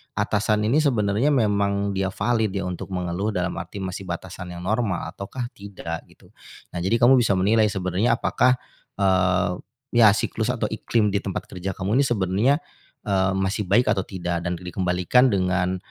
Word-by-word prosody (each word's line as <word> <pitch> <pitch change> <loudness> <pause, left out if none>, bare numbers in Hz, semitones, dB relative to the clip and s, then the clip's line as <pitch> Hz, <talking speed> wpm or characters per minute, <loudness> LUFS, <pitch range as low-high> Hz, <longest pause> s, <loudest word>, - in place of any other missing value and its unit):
atasan 105 +1 +1
ini, 120 +8 +3
sebenarnya 115 -4 +1
memang 100 -6 +1
dia 95 0 -1
valid 110 +1 0
ya 95 - -1
untuk 90 -1 -5
mengeluh, 95 +3 -2
dalam 90 0 0
arti 95 +3 -6
masih 95 +1 -5
batasan 90 +1 -6
yang 85 - -8
normal, 105 -2 0
ataukah 100 +7 -6
tidak, 95 -5 -7
gitu. - - -22 0.4
Nah - - -4
jadi 95 +6 +1
kamu 125 +3 +6
bisa 110 -5 +2
menilai 105 +4 +3
sebenarnya 95 +3 0
apakah, 125 +1 +2 0.4
eee, 95 -1 +2 0.3
ya 120 -2 +6
siklus - - -2
atau - - -1
iklim 105 -3 0
di 100 - +1
tempat 95 -2 -4
kerja 95 +1 -4
kamu 100 +7 +1
ini - - +5
sebenarnya, 105 +4 +2 0.5
eee, 95 -2 +2
masih 95 +1 -1
baik 125 - +4
atau 100 -3 +1
tidak. 90 -3 -3
Dan 90 - -1
dikembalikan 90 +7 +2
dengan, 95 -2 0
100 Hz, 165 wpm, -23 LUFS, 90-110 Hz, 0.5 s, kamu